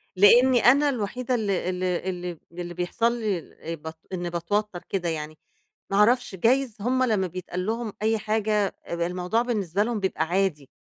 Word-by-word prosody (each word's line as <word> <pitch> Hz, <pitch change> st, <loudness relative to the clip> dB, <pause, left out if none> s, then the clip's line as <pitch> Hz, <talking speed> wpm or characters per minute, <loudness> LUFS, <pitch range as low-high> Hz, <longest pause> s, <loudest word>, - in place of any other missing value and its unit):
لأني 240 Hz, +6 st, +6 dB
أنا 285 Hz, +4 st, +6 dB
الوحيدة 250 Hz, +1 st, -2 dB
ال 215 Hz, -3 st, -1 dB
ال 185 Hz, 0 st, -1 dB
اللي 180 Hz, -1 st, -2 dB
اللي 175 Hz, 0 st, -6 dB
بيحصل 230 Hz, +7 st, 0 dB
لي 200 Hz, -7 st, -2 dB, 0.2 s
بت 160 Hz, +1 st, -8 dB, 0.2 s
إني 175 Hz, -1 st, -2 dB
باتوتر 175 Hz, +2 st, -2 dB
كده 180 Hz, -3 st, -1 dB
يعني، 155 Hz, -1 st, -4 dB, 0.5 s
ما 195 Hz, -, 0 dB
اعرفش، 230 Hz, -1 st, +3 dB
جايز 240 Hz, +3 st, +2 dB
هُم 255 Hz, +3 st, +1 dB
لمّا 210 Hz, -6 st, +1 dB
بيتقال 180 Hz, +1 st, -5 dB
لهم 225 Hz, -1 st, -2 dB
أي 220 Hz, +1 st, +2 dB
حاجة 210 Hz, -2 st, 0 dB
الموضوع 180 Hz, +5 st, 0 dB
بالنسبة 205 Hz, -5 st, 0 dB
لهم 230 Hz, -2 st, -2 dB
بيبقى 190 Hz, -4 st, 0 dB
عادي، 175 Hz, -7 st, 0 dB
200 Hz, 155 wpm, -25 LUFS, 175-230 Hz, 0.5 s, لأني